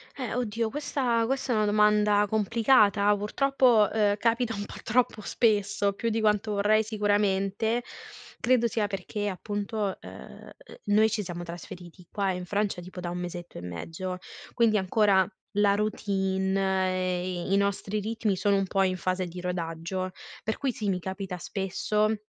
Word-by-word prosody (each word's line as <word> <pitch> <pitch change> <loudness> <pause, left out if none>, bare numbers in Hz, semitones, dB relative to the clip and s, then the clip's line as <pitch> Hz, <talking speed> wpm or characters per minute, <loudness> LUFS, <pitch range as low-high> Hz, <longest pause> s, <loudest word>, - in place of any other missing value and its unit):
Eh 250 -5 -4
oddio 230 -2 -1
questa 250 -3 0
questa 265 +1 -1
è - - +1
una 215 -1 +2
domanda 210 0 +4
complicata, 215 -1 +4
purtroppo, 240 +1 +3
ehm, 210 -2 +2
capita 230 +2 +1
un 205 -1 -4
po' - - -10
troppo 230 -2 +1
spesso, 205 -3 +1
più 230 +4 -2
di 225 0 0
quanto 210 0 +2
vorrei 210 +2 +3
sicuramente. 205 +1 +1 0.6
Credo 245 -1 +3
sia 220 -1 0
perché 205 +1 -4
appunto, 205 +1 -3
ehm, - - -12 0.3
noi 215 +2 +4
ci 215 -1 -2
siamo 175 -2 -6
trasferiti 175 +1 -9
qua 200 -2 0
in 180 0 -4
Francia 205 0 -1
tipo 180 +1 -9
da 175 -1 -4
1 175 - -4
mesetto 175 -1 -6
e - - -6
mezzo 165 - -5 0.4
quindi 230 -3 +3
ancora 190 -1 +3 0.3
la 205 -1 +4
routine 195 -2 0 0.3
e 180 -1 -2
e - - +1
i - - +5
nostri 200 +1 0
ritmi 215 -1 -1
sono 200 +2 +2
un 195 -1 0
po' 195 +1 +2
in 185 -1 0
fase 185 +1 -1
di 180 +1 -7
rodaggio. 180 +1 -3 0.3
Per 220 - -2
cui 275 -2 0
sì, 215 -3 -3
mi 185 -2 0
capita 190 0 -5
spesso 210 +4 0
205 Hz, 160 wpm, -27 LUFS, 185-220 Hz, 0.6 s, i